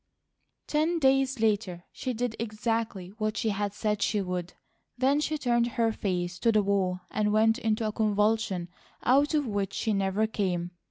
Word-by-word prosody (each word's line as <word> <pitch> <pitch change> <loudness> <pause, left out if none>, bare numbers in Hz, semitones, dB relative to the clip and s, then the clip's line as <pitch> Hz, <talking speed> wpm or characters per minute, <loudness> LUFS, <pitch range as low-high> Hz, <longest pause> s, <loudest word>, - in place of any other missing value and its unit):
Ten 315 +3 +1
days 270 -3 +2
later 205 -5 0
she 255 - -4
did 240 -1 -2
exactly 220 -4 -2
what 215 -1 -1
she 220 - 0
had 205 0 -1
said 210 0 -1
she 210 - +1
would. 180 -2 -3 0.4
Then 270 +3 +3
she 310 +1 -1
turned 240 -4 +2
her 230 -1 +3
face 180 -4 -2
to 230 - +3
the 215 -2 +3
wall 190 -2 0
and 210 -1 +1
went 220 +1 +3
into 220 0 0
a 215 - 0
convulsion 210 -4 +1 0.3
out 285 +5 +3
of 295 -2 +2
which 200 -4 -2
she 220 +1 0
never 195 +2 +1
came. 180 -5 -2
215 Hz, 170 wpm, -28 LUFS, 195-235 Hz, 0.4 s, Then